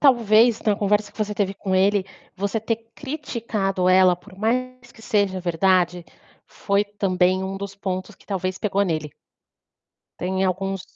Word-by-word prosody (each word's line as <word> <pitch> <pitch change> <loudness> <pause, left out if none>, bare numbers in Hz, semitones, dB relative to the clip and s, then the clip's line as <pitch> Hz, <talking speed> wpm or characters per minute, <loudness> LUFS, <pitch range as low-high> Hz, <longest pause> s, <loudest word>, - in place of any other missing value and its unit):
talvez 235 -4 +5
então 215 - +2
a - - -1
conversa 205 0 +1
que - - -21
você 210 -1 -1
teve 200 -1 -1
com 190 -1 -2
ele, 195 +1 +3 0.3
você 200 +3 -1
ter 230 +1 -3
criticado 220 -10 -2
ela, 185 -1 +5
por 190 +2 -17
mais 245 +3 -2
que 225 - -17
seja 200 -5 +1
verdade, 180 0 +2 0.4
foi 200 0 0
também 185 -2 +1
um 190 0 -4
dos 200 0 -6
pontos 190 +1 -4
que - - -24
talvez 185 -1 -2
pegou 200 -1 +1
nele. 155 -6 -2 1.1
Tem 190 +1 0
alguns 195 +1 -1
195 Hz, 160 wpm, -23 LUFS, 185-215 Hz, 1.1 s, talvez